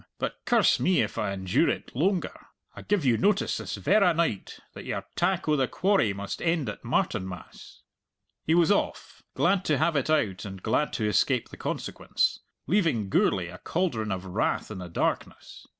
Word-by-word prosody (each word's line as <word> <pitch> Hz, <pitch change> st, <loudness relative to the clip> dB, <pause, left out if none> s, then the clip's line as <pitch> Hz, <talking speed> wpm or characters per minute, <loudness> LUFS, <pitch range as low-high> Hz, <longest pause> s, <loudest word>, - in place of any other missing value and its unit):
But -, -, -3 dB
curse 235 Hz, -4 st, +4 dB
me 185 Hz, -1 st, +3 dB
if 105 Hz, -, -4 dB
I -, -, -1 dB
endure 95 Hz, -2 st, +1 dB
it -, -, -4 dB
loanger. 180 Hz, +6 st, -1 dB, 0.3 s
I -, -, -8 dB
give 205 Hz, -8 st, 0 dB
you 120 Hz, -3 st, +3 dB
notice 205 Hz, +1 st, +2 dB
this -, -, -5 dB
verra 195 Hz, -4 st, +3 dB
night 165 Hz, -, -1 dB
that -, -, -9 dB
your -, -, -4 dB
tack 190 Hz, -2 st, 0 dB
o' 155 Hz, -, +3 dB
the 135 Hz, -3 st, +1 dB
quarry 190 Hz, -, +2 dB
must 100 Hz, 0 st, -5 dB
end 165 Hz, -4 st, 0 dB
at -, -, -8 dB
Martinmas." 105 Hz, -, -3 dB, 0.6 s
He 160 Hz, -, +2 dB
was 170 Hz, +2 st, +4 dB
off, 205 Hz, -, -1 dB
glad 195 Hz, -2 st, +2 dB
to 150 Hz, -, +2 dB
have 165 Hz, +4 st, +1 dB
it 140 Hz, +1 st, 0 dB
out 110 Hz, -12 st, +1 dB
and 95 Hz, -2 st, -8 dB
glad 130 Hz, +7 st, +1 dB
to 110 Hz, -, -1 dB
escape 105 Hz, -, +1 dB
the -, -, -11 dB
consequence, -, -, -1 dB, 0.3 s
leaving 160 Hz, -, +1 dB
Gourlay 90 Hz, -2 st, +2 dB
a 90 Hz, -, -10 dB
cauldron 125 Hz, -, -1 dB
of 95 Hz, 0 st, -3 dB
wrath 95 Hz, +3 st, -1 dB
in 100 Hz, -, -6 dB
the 90 Hz, -1 st, -7 dB
darkness. 85 Hz, -, -3 dB
140 Hz, 180 wpm, -27 LUFS, -, 0.6 s, curse